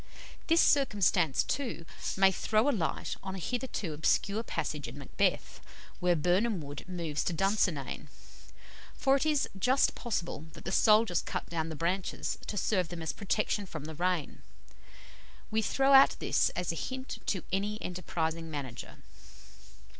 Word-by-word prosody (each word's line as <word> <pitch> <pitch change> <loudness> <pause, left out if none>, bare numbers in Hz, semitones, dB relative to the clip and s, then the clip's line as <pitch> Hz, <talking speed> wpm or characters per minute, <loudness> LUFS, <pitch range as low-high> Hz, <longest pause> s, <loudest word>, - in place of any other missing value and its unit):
This 330 +1 +5
circumstance, 205 - +3
too, 250 -11 -3 0.3
may 195 0 +6
throw 215 +5 +1
a - - +5
light 185 - -2
on 190 0 -5
a - - -5
hitherto 220 -4 -3
obscure 200 +7 +1
passage - - -3
in - - -9
"Macbeth," - - -1 0.4
where 180 -1 +3
Birnam 180 +6 +2
Wood 145 -2 -7
moves 165 -5 -2
to 175 - 0
Dunsinane 185 -5 0 0.9
for 270 0 +3
it 295 - -1
is 300 -2 +2
just 255 +8 +3
possible 170 - -3
that - - -12
the - - -2
soldiers 215 -4 +4
cut - - -4
down 165 -1 -2
the 160 - -5
branches 175 +5 -2
to 205 - -4
serve 185 -4 +1
them 170 -2 -6
as 160 - -1
a - - -14
protection 205 0 -1
from 155 -4 -7
the 160 - -6
rain. 175 -1 -1 1.1
We 220 +1 +2
throw 270 +5 +2
out 270 0 +8
this - - +2
as 180 -2 -1
a - - -5
hint 260 - -5
to 185 -5 -1
any 205 +2 -1
enterprising 165 -3 -3
manager. 140 -6 -7
185 Hz, 155 wpm, -31 LUFS, 165-220 Hz, 1.1 s, out